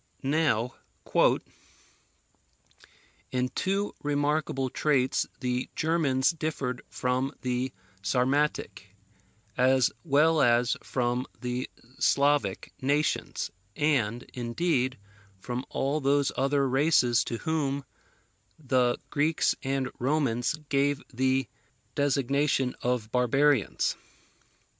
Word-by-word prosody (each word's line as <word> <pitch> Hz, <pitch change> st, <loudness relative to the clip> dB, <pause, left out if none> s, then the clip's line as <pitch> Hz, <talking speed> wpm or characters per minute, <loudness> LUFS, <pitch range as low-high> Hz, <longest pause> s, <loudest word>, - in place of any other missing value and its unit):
Now, 135 Hz, -5 st, +1 dB, 2.5 s
"in 125 Hz, 0 st, 0 dB
two 195 Hz, +6 st, -1 dB
remarkable 145 Hz, -2 st, 0 dB
traits 135 Hz, -4 st, +1 dB
the 125 Hz, 0 st, -1 dB
Germans 155 Hz, -4 st, +2 dB
differed 155 Hz, -6 st, -3 dB
from 130 Hz, +2 st, -1 dB
the 125 Hz, +1 st, -1 dB, 0.3 s
Sarmatic, 125 Hz, -2 st, 0 dB, 0.6 s
as 130 Hz, 0 st, +4 dB
well 155 Hz, 0 st, +4 dB
as 120 Hz, -1 st, +3 dB
from 125 Hz, 0 st, -1 dB
the 125 Hz, 0 st, -3 dB, 0.3 s
Slavic 140 Hz, -8 st, +2 dB
nations, 145 Hz, +3 st, 0 dB, 0.2 s
and, 125 Hz, -6 st, +1 dB
indeed, 130 Hz, +2 st, 0 dB, 0.4 s
from 125 Hz, +5 st, -4 dB
all 140 Hz, +3 st, 0 dB
those 140 Hz, 0 st, +2 dB
other 140 Hz, 0 st, +2 dB
races 130 Hz, -3 st, +3 dB
to 115 Hz, -, -3 dB
whom 140 Hz, -2 st, -1 dB, 0.7 s
the 125 Hz, -4 st, +1 dB
Greeks 150 Hz, +2 st, +2 dB
and 135 Hz, -1 st, -1 dB
Romans 130 Hz, -2 st, +1 dB
gave 140 Hz, 0 st, +2 dB
the 130 Hz, +1 st, +1 dB, 0.5 s
designation 140 Hz, -1 st, +1 dB
of 120 Hz, -3 st, -1 dB
barbarians. 130 Hz, 0 st, +2 dB
135 Hz, 85 wpm, -28 LUFS, 125-145 Hz, 2.5 s, as